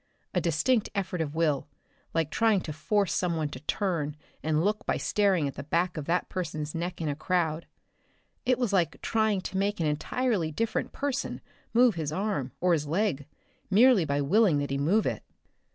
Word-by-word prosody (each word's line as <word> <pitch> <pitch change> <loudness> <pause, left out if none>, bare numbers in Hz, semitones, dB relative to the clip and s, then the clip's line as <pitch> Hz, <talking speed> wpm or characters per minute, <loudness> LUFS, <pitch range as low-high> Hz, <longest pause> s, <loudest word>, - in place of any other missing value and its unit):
A 180 - +1
distinct 170 - +1
effort 185 -3 -1
of 150 -1 -3
will, 155 -4 +1 0.4
like 160 -2 0
trying 225 -3 +3
to 155 - -5
force 195 +5 0
someone 165 -4 0
to 130 - -8
turn 155 -2 -1 0.3
and 155 +2 +1
look 210 +1 0
by - - +1
staring 195 -7 +2
at 140 - -4
the - - -6
back 170 +4 0
of 155 -3 -4
that 175 +3 +1
someone's 155 -4 -3
neck 170 +1 -4
in 160 - -1
a 145 - -1
crowd. 165 0 -1 0.8
It 255 -1 +2
was 240 -5 -1
like 175 -4 +1
trying 220 -3 +1
to 190 - -4
make 200 +1 0
an 165 - +1
entirely 195 - 0
different 230 +8 -1
person 275 -1 -2 0.3
move 240 0 +5
his 160 -4 -3
arm, 185 -8 -2
or 180 0 +3
his 150 -3 0
leg, 160 -4 0 0.4
merely 220 0 +6
by 145 -1 0
willing 180 +2 +4
that 145 -1 -2
he 140 - 0
move 190 +10 +2
it. - - -1
175 Hz, 185 wpm, -28 LUFS, 155-205 Hz, 0.8 s, merely